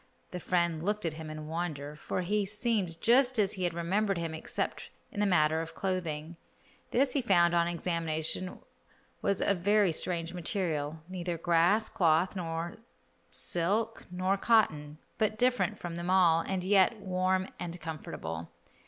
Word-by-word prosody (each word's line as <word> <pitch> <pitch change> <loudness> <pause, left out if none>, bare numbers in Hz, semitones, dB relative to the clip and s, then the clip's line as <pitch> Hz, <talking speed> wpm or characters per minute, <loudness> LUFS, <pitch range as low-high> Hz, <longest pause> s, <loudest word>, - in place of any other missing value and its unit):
The 180 - -4
friend 170 -2 0
looked 210 0 -1
at 165 - 0
him 155 0 -7
in 155 0 -7
wonder, 155 -3 -4
for 170 - -3
he 205 +3 +1
seemed 205 -4 0
just 250 +1 +4
as 200 -3 +2
he 185 -2 -2
had 170 -1 -1
remembered 195 +4 0
him 165 -1 -3
except 160 - -4 0.2
in - - -6
the 205 - +3
matter 160 -3 +3
of 165 0 -8
clothing. 170 -4 -3 0.5
This 265 +1 +2
he 275 - +1
found 175 -7 +4
on 170 0 +3
examination 170 0 -1 0.6
was 200 -1 0
of 200 -3 +2
very 205 0 +3
strange 170 +1 0
material, 160 -4 -2
neither 180 -2 -4
grass 175 +6 +3
cloth, 170 +2 +2 0.9
silk 210 +7 -2
nor 185 +2 0
cotton, 155 -10 +2 0.2
but 215 -1 +1
different 215 -5 +1
from 170 -3 -6
them 170 +1 -4
all, 180 -3 +5
and 190 -2 -1
yet 195 +3 +4
warm 185 0 0
and 175 0 -5
comfortable. 140 - -6
180 Hz, 155 wpm, -30 LUFS, 165-200 Hz, 0.9 s, all